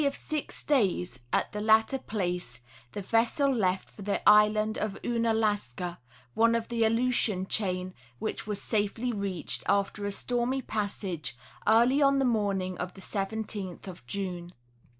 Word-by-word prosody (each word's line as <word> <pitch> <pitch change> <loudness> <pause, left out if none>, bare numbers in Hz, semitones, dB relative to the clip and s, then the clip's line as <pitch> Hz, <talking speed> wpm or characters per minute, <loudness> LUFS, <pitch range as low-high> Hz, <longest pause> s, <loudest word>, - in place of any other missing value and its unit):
173 290 - +3
of 300 +2 -1
six - - -2
days 185 - +1
at - - +1
the 210 - -4
latter 220 +5 +4
place 180 - -3 0.3
the 205 - -4
vessel 230 +7 +2
left 190 -5 0
for - - -14
the 200 0 -1
island 215 +1 +5
of 210 -2 -2
Ounalaska, 215 - 0 0.3
one 230 +1 +4
of 230 -1 -2
the 235 -1 +1
Aleutian 225 -4 +2
chain, 185 -2 -1 0.2
which - - -4
was 210 -2 -1
safely 220 +4 -1
reached, 195 -5 -2
after 200 +1 +1
a - - -2
stormy 245 +5 -1
passage, 190 - -3 0.3
early 240 +6 +5
on 275 -1 +5
the 270 - +2
morning 200 -6 0
of 180 0 -4
the 190 - -11
17th 200 -2 -4
of 180 -8 -9
June. 180 -2 -4
210 Hz, 150 wpm, -29 LUFS, 185-230 Hz, 0.3 s, island